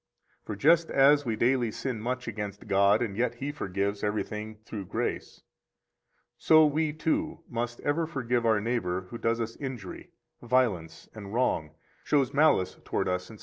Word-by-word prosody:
94 105 Hz, -, -2 dB
For -, -, -13 dB
just 165 Hz, +2 st, +4 dB
as 145 Hz, +1 st, +5 dB
we 115 Hz, -2 st, -1 dB
daily 120 Hz, +1 st, +2 dB
sin 115 Hz, 0 st, -4 dB
much 125 Hz, +2 st, -3 dB
against 105 Hz, -3 st, -5 dB
God, 100 Hz, +3 st, +4 dB
and 100 Hz, -4 st, -4 dB
yet 120 Hz, +1 st, 0 dB
He 140 Hz, +4 st, -4 dB
forgives 100 Hz, -5 st, -3 dB
everything 105 Hz, +1 st, -3 dB
through 105 Hz, -4 st, -6 dB
grace, -, -, -3 dB, 1.0 s
so 155 Hz, -1 st, +6 dB
we, 150 Hz, +1 st, +1 dB
too, 155 Hz, 0 st, -2 dB
must 120 Hz, 0 st, -4 dB
ever 155 Hz, +3 st, 0 dB
forgive 125 Hz, -5 st, -1 dB
our 110 Hz, -2 st, +3 dB
neighbor 105 Hz, -5 st, -1 dB
who 120 Hz, -, -6 dB
does 115 Hz, 0 st, 0 dB
us 115 Hz, 0 st, -3 dB
injury, 125 Hz, -9 st, -7 dB, 0.3 s
violence, 115 Hz, -10 st, 0 dB
and 105 Hz, -1 st, -8 dB
wrong, 80 Hz, -11 st, 0 dB, 0.3 s
shows 140 Hz, -4 st, +1 dB
malice 145 Hz, -11 st, +3 dB
toward -, -, -1 dB
us, 90 Hz, 0 st, -2 dB
etc. 110 Hz, -, -12 dB
115 Hz, 165 wpm, -28 LUFS, 105-135 Hz, 1.0 s, so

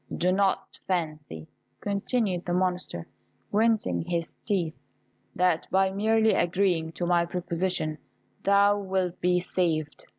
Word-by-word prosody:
Do 180 Hz, +1 st, +2 dB
not 195 Hz, +1 st, 0 dB
fancy," 155 Hz, -, -3 dB, 0.3 s
continued 200 Hz, -2 st, -1 dB
the 175 Hz, -, 0 dB
Monster, 180 Hz, -, -1 dB, 0.5 s
grinding 215 Hz, -, +2 dB
his 170 Hz, -, -3 dB
teeth, 180 Hz, -7 st, 0 dB, 0.6 s
"that 180 Hz, -2 st, +2 dB
by 190 Hz, 0 st, +3 dB
merely 220 Hz, +2 st, +3 dB
agreeing 175 Hz, -2 st, +1 dB
to 175 Hz, -, -3 dB
my 175 Hz, 0 st, +3 dB
proposition 175 Hz, -2 st, -1 dB, 0.4 s
thou 200 Hz, +1 st, +4 dB
wilt 190 Hz, -2 st, -2 dB
be 180 Hz, 0 st, +3 dB
saved. 165 Hz, -4 st, -1 dB
180 Hz, 120 wpm, -27 LUFS, 170-195 Hz, 0.6 s, thou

